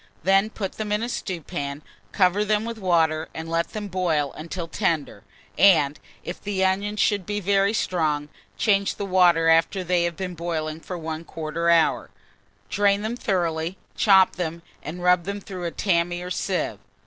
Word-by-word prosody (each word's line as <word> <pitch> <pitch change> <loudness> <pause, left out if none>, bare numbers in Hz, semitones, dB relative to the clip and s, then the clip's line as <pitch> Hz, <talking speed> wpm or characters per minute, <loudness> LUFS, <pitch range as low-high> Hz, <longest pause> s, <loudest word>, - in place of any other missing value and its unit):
Then 195 +4 +3
put 195 -4 -4
them 215 -1 -3
in 210 +2 +1
a - - -1
stewpan, 155 -8 -4 0.3
cover 190 +1 +3
them 210 +1 +1
with 230 -1 -5
water, 165 -4 +1
and 160 0 -5
let 165 +1 -1
them 210 -1 -4
boil 170 -7 0
until 165 +2 -6
tender, 160 - -2 0.4
and, 155 -7 +5 0.2
if 175 - -6
the 195 -2 0
onions 200 +3 0
should 205 -3 +2
be 205 +3 -3
very 200 +1 +2
strong, 155 -8 -1 0.3
change 200 -2 +2
the 200 - -4
water 175 -3 +4
after 165 +4 +3
they 175 -1 +1
have 170 -1 -2
been 185 -2 -4
boiling 160 -2 -3
for 180 +2 -6
1/4 160 0 -2
hour. 165 -2 +3 0.6
Drain 200 - +2
them 220 +2 -2
thoroughly, 175 -6 -1 0.2
chop 190 -3 +5
them, 170 -1 -4 0.2
and 175 +4 -7
rub 180 -1 +4
them 200 +1 -3
through 185 -3 -7
a - - 0
tammy 175 -1 0
or 180 - -6
sieve. - - -2
180 Hz, 170 wpm, -24 LUFS, 165-200 Hz, 0.6 s, and